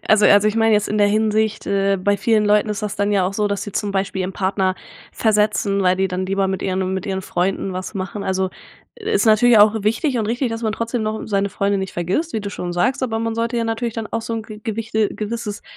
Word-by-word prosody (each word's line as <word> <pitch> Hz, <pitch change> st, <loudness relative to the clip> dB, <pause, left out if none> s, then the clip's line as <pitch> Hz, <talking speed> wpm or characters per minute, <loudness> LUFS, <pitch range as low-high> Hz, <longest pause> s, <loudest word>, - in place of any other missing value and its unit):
Also 215 Hz, -1 st, +5 dB
also 205 Hz, +1 st, +6 dB
ich 215 Hz, -, -2 dB
meine 225 Hz, -1 st, +3 dB
jetzt 210 Hz, -, +1 dB
in 210 Hz, -, -1 dB
der 205 Hz, -, +5 dB
Hinsicht, 215 Hz, +1 st, +1 dB
äh, 195 Hz, 0 st, +1 dB
bei 200 Hz, +2 st, +1 dB
vielen 215 Hz, +1 st, +2 dB
Leuten 210 Hz, +1 st, +3 dB
ist 210 Hz, 0 st, -3 dB
das 210 Hz, -2 st, -3 dB
dann 205 Hz, +1 st, 0 dB
ja 190 Hz, -2 st, +2 dB
auch 190 Hz, -, -3 dB
so, 210 Hz, 0 st, 0 dB
dass 200 Hz, -1 st, -2 dB
sie 205 Hz, -, -7 dB
zum 205 Hz, -2 st, -2 dB
Beispiel 195 Hz, -1 st, -1 dB
ihren 185 Hz, -, -3 dB
Partner 190 Hz, -1 st, 0 dB, 0.4 s
versetzen, 210 Hz, -2 st, +1 dB
weil 185 Hz, 0 st, +3 dB
die 190 Hz, 0 st, +1 dB
dann 185 Hz, +1 st, -3 dB
lieber 195 Hz, 0 st, 0 dB
mit 190 Hz, -, -3 dB
ihren 190 Hz, 0 st, -1 dB
mit 190 Hz, +2 st, -4 dB
ihren 190 Hz, -1 st, -2 dB
Freunden 190 Hz, +2 st, -1 dB
was 185 Hz, +3 st, -5 dB
machen. 195 Hz, +1 st, -4 dB
Also, 190 Hz, 0 st, 0 dB, 0.5 s
i -, -, -10 dB
ist 425 Hz, -, +1 dB
natürlich 220 Hz, +1 st, +6 dB
auch 215 Hz, +1 st, +5 dB
wichtig 235 Hz, +5 st, 0 dB
und 215 Hz, -, -1 dB
richtig, 240 Hz, +3 st, -1 dB
dass 225 Hz, +1 st, -4 dB
man 220 Hz, -1 st, 0 dB
trotzdem 230 Hz, +1 st, -2 dB
noch 215 Hz, 0 st, -3 dB
seine 200 Hz, -1 st, 0 dB
Freunde 200 Hz, +1 st, 0 dB
nicht 190 Hz, -1 st, -4 dB
vergisst, 190 Hz, -, -1 dB
wie 220 Hz, -, -1 dB
du 200 Hz, -1 st, -5 dB
schon 175 Hz, -3 st, -5 dB
sagst, 250 Hz, +11 st, 0 dB
aber 225 Hz, -3 st, -1 dB
man 225 Hz, 0 st, -2 dB
sollte 230 Hz, +1 st, -1 dB
ja 230 Hz, -, 0 dB
natürlich 225 Hz, 0 st, -2 dB
dann 225 Hz, -1 st, -4 dB
auch 230 Hz, -, -3 dB
so 230 Hz, -, -4 dB
'n 225 Hz, -, -3 dB
ge 215 Hz, 0 st, -11 dB
gewichte 220 Hz, -1 st, -1 dB
gewisses 215 Hz, -1 st, -4 dB
210 Hz, 260 wpm, -20 LUFS, 195-225 Hz, 0.5 s, also